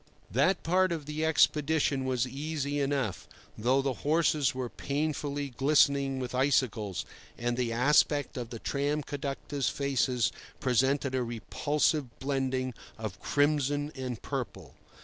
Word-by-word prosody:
That 190 +1 +2
part 185 +2 +3
of 160 -4 -3
the 150 +1 -3
expedition 150 -3 +2
was 130 -1 0
easy 145 +1 -3
enough, 135 -10 -1 0.3
though 130 +5 +2
the 135 -1 0
horses 150 -3 +2
were 130 -1 -2
painfully 145 +1 -2
glistening 140 +1 +3
with 130 -1 -4
icicles, 125 -7 +1 0.3
and 120 0 -1
the 120 -2 -1
aspect 145 +3 +3
of 120 -2 -4
the 120 - -6
tram 145 +5 -1
conductors' 140 -1 -3
faces 130 -4 +1 0.3
presented 130 +2 +2
a 130 - +1
repulsive 130 +3 -1
blending 130 -2 -1 0.2
of 110 -4 -6
crimson 145 0 +1
and 130 -4 -4
purple. - - -5
140 Hz, 130 wpm, -30 LUFS, 125-145 Hz, 0.3 s, part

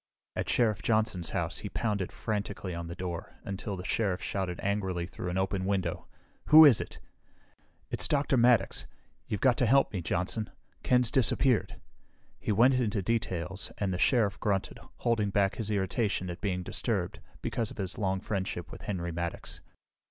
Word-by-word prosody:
At - - -2
Sheriff 110 -7 +2
Johnson's 110 -5 +1
house - - -2
he - - -5
pounded 105 -5 -1
frantically 100 -3 -3
on 85 0 -5
the 85 - -6
door 90 -2 -5
until 100 0 -4
the 90 - -7
Sheriff 95 -4 0
shouted 95 -2 -3
angrily 95 -4 -1
through 85 +1 -6
an 90 - -2
open 95 0 0
window, 95 -3 -1 0.4
"Who 155 +1 +10
is 135 -7 +7
it?" - - -8 0.9
"It's - - +1
Dr. 140 -1 +2
Maddox. 120 -4 +3 0.4
You've 105 - -3
got 125 -2 +4
to 125 - +2
help 135 +1 +4
me, 95 - -2
Johnson. 90 +6 -1 0.3
Ken's 125 -2 +3
disappeared." 130 -3 +2 0.6
He - - -2
went 120 +6 +5
into 110 -5 0
details, 95 -3 -2
and 100 -2 -1
the 90 - -3
Sheriff 110 -5 +3
grunted, 100 -2 -1 0.2
holding 115 -4 +1
back 100 -1 +1
his 110 -2 -3
irritation 100 -2 0
at 85 - -8
being 90 -3 -1
disturbed, - - -2 0.2
because 115 -2 -1
of - - -11
his 95 +3 -4
long 95 -2 0
friendship 95 -3 -3
with - - -9
Henry 85 -4 -3
Maddox. 85 0 -4
100 Hz, 165 wpm, -30 LUFS, 90-115 Hz, 0.9 s, Who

